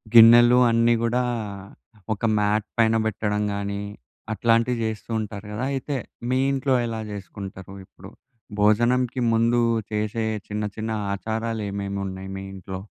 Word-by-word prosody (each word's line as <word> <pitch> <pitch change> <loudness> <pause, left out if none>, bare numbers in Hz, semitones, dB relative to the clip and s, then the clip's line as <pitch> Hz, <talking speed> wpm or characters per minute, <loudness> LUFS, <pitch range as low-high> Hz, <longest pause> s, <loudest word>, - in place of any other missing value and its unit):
గిన్నెలు 120 +2 +9
అన్నీ 115 +1 +4
కూడా 125 +2 +1 0.9
ఒక 110 - -4
మ్యాట్ 105 +1 +1
పైన 115 0 +4
పెట్టడం 105 0 -1
గానీ, 100 0 -3 0.5
అట్లాంటివి 115 +2 +2
చేస్తూ 110 +1 -5
ఉంటారు 105 -1 -6
కదా. 115 - -3
అయితే 135 +1 -3 0.3
మీ 130 - +2
ఇంట్లో 135 0 0
ఎలా 115 -1 -4
చేసుకుంటారు? 95 -1 -8
ఇప్పుడు 100 +2 -14 0.5
భోజనంకి 120 +4 +2
ముందు 115 +1 +3 0.3
చేసే 105 +1 -1 0.2
చిన్న, 105 0 -3
చిన్న 110 +1 -3 0.2
ఆచారాలు 110 +2 -3
ఏమేమి 100 0 -3
ఉన్నాయి 95 0 -7
మీ 95 - -6
ఇంట్లో? 95 0 -7
110 Hz, 130 wpm, -24 LUFS, 100-115 Hz, 0.9 s, గిన్నెలు